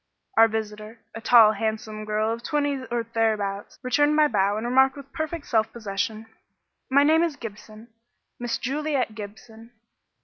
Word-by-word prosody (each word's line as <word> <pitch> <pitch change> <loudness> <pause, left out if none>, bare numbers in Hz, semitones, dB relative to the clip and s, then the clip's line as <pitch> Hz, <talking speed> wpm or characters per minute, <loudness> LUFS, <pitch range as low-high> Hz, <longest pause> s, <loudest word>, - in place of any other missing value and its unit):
Our 225 - +7
visitor, 215 0 -5
a 225 - -7
tall 230 -2 +7
handsome 215 0 -4
girl 215 +1 0
of 230 - -7
twenty 285 -1 -1
or 235 -1 -1
thereabouts, 215 -3 -2
returned 290 +4 +2
my 305 0 +5
bow 205 -4 +1
and 220 - -4
remarked 265 +3 +3
with 275 0 -12
perfect 315 -1 -4
self 220 -2 +1
possession, 215 0 -4 0.6
"My 280 +2 +5
name 315 +2 +4
is 335 -3 0
Gibson 215 -2 -10 0.5
Miss 240 -1 -2
Juliet 280 -3 -2
Gibson. 220 +2 -11
230 Hz, 150 wpm, -25 LUFS, 215-275 Hz, 0.6 s, Our